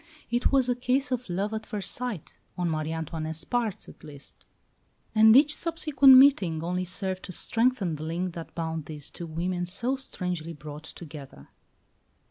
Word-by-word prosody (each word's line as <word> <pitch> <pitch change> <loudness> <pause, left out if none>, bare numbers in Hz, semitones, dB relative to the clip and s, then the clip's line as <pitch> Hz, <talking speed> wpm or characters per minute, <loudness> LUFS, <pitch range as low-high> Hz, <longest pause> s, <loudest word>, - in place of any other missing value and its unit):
It 240 +1 +1
was 270 -2 +3
a 250 - +2
case 250 +2 0
of 250 -4 -2
love 195 +5 -2
at 220 0 -4
first 205 -2 -3
sight, 245 -10 -5 0.2
on 175 -2 0
Marie 155 0 -2
Antoinette's 160 0 -4
part 225 -5 -2
at - - -15
least; 145 -2 -13 0.7
and 220 +1 +7
each 300 +3 +6
subsequent 285 -5 +5
meeting 195 - +5
only 180 +2 -2
served 185 +1 -3
to - - -7
strengthen 225 -4 0
the 150 - -7
link 170 +3 -3
that 165 -1 -9
bound 160 -2 -3
these 150 -2 -6
two 170 - -8
women 175 +2 -2
so 235 +9 -2
strangely 180 -10 -4
brought 150 +1 -9
together. 145 - -11
180 Hz, 165 wpm, -27 LUFS, 160-245 Hz, 0.7 s, and